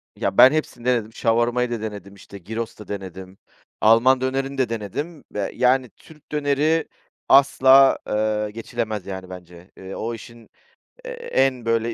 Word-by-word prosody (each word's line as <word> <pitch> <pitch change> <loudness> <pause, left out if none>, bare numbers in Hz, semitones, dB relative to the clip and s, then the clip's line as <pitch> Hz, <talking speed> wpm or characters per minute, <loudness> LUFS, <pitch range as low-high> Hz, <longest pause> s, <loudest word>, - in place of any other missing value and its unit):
Ya, - - -3
ben 130 - +9
hepsini 150 -6 -3
denedim. 115 -3 0
Shawarma'yı 120 +2 0
da 115 - -3
denedim, 105 -3 -7
işte 100 0 -13
Gyros 110 +5 -6
da 105 - -11
denedim, 95 -1 -8 0.4
Alman 120 +4 +5
dönerini 135 +1 -2
de 130 -3 0
denedim 125 - -5
ve, 100 -2 -3
yani, 125 0 +2
Türk 155 -2 -19
döneri 150 +2 +1 0.4
asla, 135 0 +6
ııı, 105 0 -1
geçilemez 110 -2 -5
yani, 95 -1 -7
bence. 90 0 -12
Eee, 95 0 -9
o 115 +2 -4
işin, 115 0 -12 0.6
eee, - - -6
en 135 - -1
böyle 115 0 0
115 Hz, 150 wpm, -22 LUFS, 105-135 Hz, 0.6 s, ben